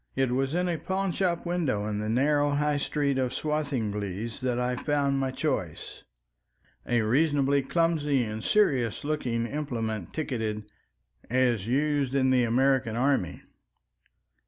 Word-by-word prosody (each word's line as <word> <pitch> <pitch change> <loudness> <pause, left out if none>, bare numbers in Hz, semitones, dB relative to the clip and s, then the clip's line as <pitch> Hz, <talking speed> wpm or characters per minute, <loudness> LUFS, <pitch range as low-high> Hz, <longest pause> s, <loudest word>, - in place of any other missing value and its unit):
It 135 -2 +1
was 135 +4 0
in 180 +1 +1
a 170 -3 -1
pawnshop 185 0 -1
window 160 -12 0
in 105 -1 -2
the 105 0 -3
narrow 145 +5 +2
High 150 0 +1
Street 140 -1 0
of 130 -1 -1
Swathinglea 115 -9 -2
that 125 -2 0
I 125 0 0
found 140 0 0
my 135 -1 0
choice, 130 - -3 0.9
a 120 -1 +2
reasonably 140 +3 +2
clumsy 150 -3 +1
and 110 -1 -5
serious 135 - +2
looking 125 -6 -1
implement 115 - -3
ticketed 110 -8 -3 0.7
"As 120 -4 +1
used 140 +1 +1
in 130 -1 +3
the 125 -2 +4
American 125 -1 +2
army." 125 -8 0
135 Hz, 135 wpm, -27 LUFS, 115-150 Hz, 0.9 s, the